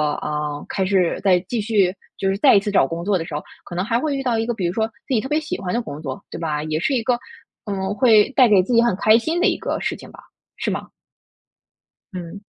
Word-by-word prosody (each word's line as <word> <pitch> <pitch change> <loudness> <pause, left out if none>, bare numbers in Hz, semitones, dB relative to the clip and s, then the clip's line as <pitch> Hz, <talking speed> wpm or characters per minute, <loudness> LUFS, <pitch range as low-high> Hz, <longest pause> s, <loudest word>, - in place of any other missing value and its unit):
呃， 150 -1 -4
开 190 - -1
始 185 -3 +2
在 185 -3 +4
继 235 0 -1
续， 205 -4 +2 0.2
就 195 - 0
是 195 - 0
再 270 0 +6
一 - - +7
次 205 +1 -3
找 195 - +4
工 165 +5 -5
作 200 -1 +2
的 165 - -3
时 165 - -9
候， 150 - -2 0.2
可 - - -10
能 180 +2 -1
还 230 +1 +1
会 280 +2 -1
遇 - - -2
到 245 -4 0
一 225 - 0
个 240 - -1
比 195 -5 -3
如 170 - -2
说 220 +2 +1
自 225 +4 -8
己 225 - +2
特 265 - -6
别 300 - +2
喜 310 0 -4
欢 180 -2 -3
的 240 - +1
工 155 -10 -8
作， 135 -4 -5
对 - - -7
吧？ 155 -3 -2
也 155 0 -2
是 275 - 0
一 250 - +1
个 245 +1 +1 0.5
嗯， 195 -1 -2
会 220 -4 +5
带 260 -2 +5
给 205 -4 +5
自 220 - -2
己 230 - +6
很 235 -5 +2
开 215 +3 +5
心 320 +9 -1
的 375 - +4
一 - - +1
个 - - -3
事 - - -2
情 - - -13
吧， - - -14 0.4
是 - - -2
吗？ - - -4 1.3
嗯。 180 +2 -7
200 Hz, 290 characters per minute, -21 LUFS, 175-235 Hz, 1.3 s, 一